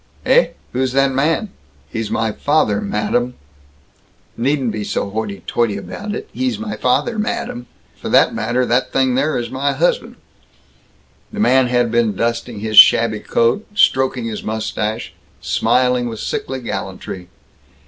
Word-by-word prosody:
"Heh? -, -, +4 dB, 0.2 s
Who's 130 Hz, 0 st, 0 dB
that 135 Hz, 0 st, +3 dB
man?" 160 Hz, +9 st, 0 dB, 0.4 s
"He's 115 Hz, -2 st, -4 dB
my 110 Hz, 0 st, 0 dB
father, 110 Hz, -5 st, +1 dB
madam." 120 Hz, +5 st, -1 dB, 1.0 s
"Needn't 130 Hz, 0 st, 0 dB
to 110 Hz, -, -4 dB
be -, -, -3 dB
so 100 Hz, 0 st, -3 dB
hoity 105 Hz, -2 st, -4 dB
toity 115 Hz, -4 st, 0 dB
about 205 Hz, -, -6 dB
it, -, -, -6 dB
'he's 255 Hz, -3 st, -1 dB
my 220 Hz, -1 st, -5 dB
father, 240 Hz, -3 st, 0 dB
madam!' 125 Hz, -, -3 dB, 0.4 s
F' -, -, -3 dB
that -, -, +4 dB
matter, 120 Hz, +3 st, 0 dB
that 120 Hz, +2 st, +1 dB
thing 130 Hz, -1 st, +2 dB
there 140 Hz, +5 st, +1 dB
is 120 Hz, -1 st, -4 dB
my 135 Hz, +2 st, 0 dB
husband!" -, -, 0 dB, 1.2 s
The 215 Hz, -, -6 dB
man 130 Hz, -10 st, +4 dB
had 120 Hz, -1 st, +1 dB
been 115 Hz, -3 st, +1 dB
dusting 115 Hz, 0 st, -2 dB
his 110 Hz, -1 st, -2 dB
shabby 110 Hz, -2 st, +6 dB
coat, 115 Hz, -, 0 dB
stroking 130 Hz, -, +2 dB
his 110 Hz, -2 st, -4 dB
mustache, 110 Hz, +1 st, -3 dB, 0.3 s
smiling 125 Hz, -1 st, +1 dB
with 110 Hz, -2 st, -7 dB
sickly 130 Hz, -1 st, -3 dB
gallantry. 95 Hz, -5 st, -6 dB
125 Hz, 150 wpm, -18 LUFS, 110-135 Hz, 1.2 s, shabby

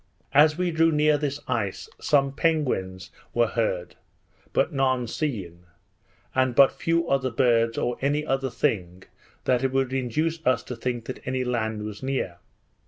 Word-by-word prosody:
As 150 Hz, +2 st, +5 dB
we 180 Hz, -1 st, 0 dB
drew 165 Hz, 0 st, +3 dB
near 150 Hz, 0 st, +3 dB
this 145 Hz, -1 st, -2 dB
ice 95 Hz, -4 st, -2 dB
some 140 Hz, -2 st, +2 dB
penguins 130 Hz, -, -1 dB, 0.2 s
were 120 Hz, 0 st, +4 dB
heard, 95 Hz, -6 st, -2 dB, 0.6 s
but -, -, +1 dB
none 130 Hz, -2 st, +1 dB
seen; 95 Hz, -, -4 dB, 0.7 s
and 130 Hz, -2 st, +1 dB
but 140 Hz, 0 st, +7 dB
few 165 Hz, 0 st, 0 dB
other 135 Hz, -3 st, +1 dB
birds 115 Hz, -1 st, +2 dB
or 120 Hz, 0 st, -1 dB
any 145 Hz, +2 st, 0 dB
other 135 Hz, -2 st, 0 dB
thing 90 Hz, -6 st, -2 dB, 0.4 s
that 125 Hz, -1 st, +2 dB
could 135 Hz, -1 st, 0 dB
induce 155 Hz, +6 st, -1 dB
us 130 Hz, -3 st, +2 dB
to 125 Hz, -, -6 dB
think 120 Hz, +1 st, -4 dB
any 130 Hz, 0 st, 0 dB
land 110 Hz, -4 st, -2 dB
was 105 Hz, -1 st, -7 dB
near. 130 Hz, -10 st, -2 dB
130 Hz, 150 wpm, -25 LUFS, 115-145 Hz, 0.7 s, but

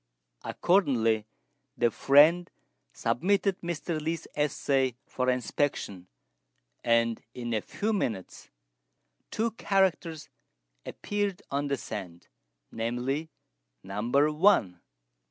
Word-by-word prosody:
Accordingly, 115 Hz, -, +2 dB, 0.5 s
the 120 Hz, -1 st, +3 dB
friend 155 Hz, +8 st, +5 dB, 0.4 s
submitted 190 Hz, +4 st, 0 dB
Mr. 170 Hz, -1 st, -3 dB
Li's 160 Hz, +1 st, -3 dB
essay 135 Hz, -3 st, +1 dB
for 130 Hz, 0 st, -1 dB
inspection; 125 Hz, -7 st, -1 dB, 0.8 s
and 115 Hz, -1 st, +2 dB
in 120 Hz, -1 st, -4 dB
a 110 Hz, -, +1 dB
few 215 Hz, -, -2 dB
minutes 110 Hz, -, -3 dB, 0.8 s
two 225 Hz, +1 st, -1 dB
characters 180 Hz, -7 st, 0 dB, 0.6 s
appeared 205 Hz, -3 st, -3 dB
on 140 Hz, +1 st, -1 dB
the 140 Hz, -1 st, 0 dB
sand 90 Hz, -7 st, -8 dB, 0.4 s
namely, 125 Hz, +7 st, -2 dB, 0.5 s
"Number 120 Hz, +10 st, +1 dB
one." 150 Hz, -, +3 dB
140 Hz, 90 wpm, -28 LUFS, 115-175 Hz, 0.8 s, friend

